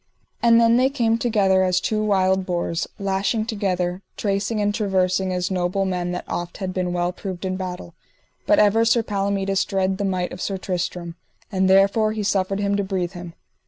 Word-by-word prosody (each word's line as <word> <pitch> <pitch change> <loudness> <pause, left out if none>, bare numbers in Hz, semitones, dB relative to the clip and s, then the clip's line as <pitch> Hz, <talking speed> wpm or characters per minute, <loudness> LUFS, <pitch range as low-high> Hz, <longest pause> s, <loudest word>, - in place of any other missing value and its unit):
And 235 0 +5
then 230 0 +5
they 260 +1 +3
came 230 -5 +1
together 200 -6 +2
as 185 -1 +2
two 215 +3 -1
wild 190 -2 +2
boars, 175 -2 -2
lashing 200 +3 -1
together, 185 -5 -2 0.2
tracing 200 +2 -1
and 205 0 +1
traversing 190 -3 0
as 180 +1 -2
noble 185 +1 0
men 180 -2 -2
that 180 - -4
oft 175 0 -4
had 185 -2 -4
been 180 -1 -1
well 175 0 0
proved 185 0 -6
in 185 0 -1
battle; 180 -2 -6 0.5
but 310 - +5
ever 210 +2 +4
Sir 230 0 +3
Palomides 195 -2 0
dread 190 0 -1
the - - -1
might 185 -2 -1
of 180 - -8
Sir 195 - -2
Tristram, 175 -2 -4 0.3
and 190 -1 +1
therefore 200 +3 +4
he 215 -1 -3
suffered 195 -1 0
him 200 0 0
to 200 - 0
breathe 185 -2 -2
him. 175 -2 -9
190 Hz, 190 wpm, -22 LUFS, 180-205 Hz, 0.5 s, And